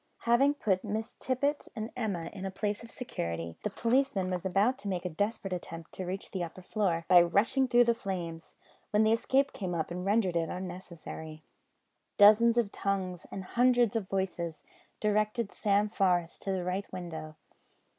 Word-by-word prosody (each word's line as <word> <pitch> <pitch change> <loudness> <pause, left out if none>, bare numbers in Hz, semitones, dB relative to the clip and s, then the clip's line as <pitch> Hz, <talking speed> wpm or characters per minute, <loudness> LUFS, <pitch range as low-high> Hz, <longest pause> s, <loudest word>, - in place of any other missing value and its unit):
Having 270 +5 +4
put 190 -9 0
Miss 220 +2 -3
Tippet 280 +3 -1
and 220 +1 -4
Emma 195 -9 -2
in 195 -2 -7
a 195 - -2
place 205 +3 -3
of 230 - -11
security, 85 - -4
the - - -1
policeman 230 -4 +1
was 180 -1 -2
about 200 +8 +2
to 210 - -7
make 185 -2 -2
a - - 0
desperate 205 +2 -2
attempt 165 -2 -7
to 185 - -5
reach 190 +2 -5
the 185 -3 -2
upper 175 +2 -8
floor 175 -5 0
by 180 -1 +8
rushing 220 +10 +3
through 245 -1 +6
the 235 0 +3
flames, 175 -6 -5 0.3
when 210 +1 +3
the 220 - +4
escape 270 +4 +2
came 180 -4 -3
up 160 0 -2
and 180 +1 -4
rendered 200 -2 +2
it 165 -1 +1
unnecessary. 175 -4 -7 0.7
Dozens 220 +3 +7
of 225 -4 +2
tongues 190 -3 -2
and 190 - -6
hundreds 240 +1 +3
of 205 -4 -2
voices 175 -5 -2 0.4
directed 215 +1 +1
Sam 205 0 +2
Forest 180 -5 +1
to 195 - -2
the 185 -2 -1
right 185 +3 -3
window. 160 -3 -6
195 Hz, 175 wpm, -30 LUFS, 175-225 Hz, 0.7 s, by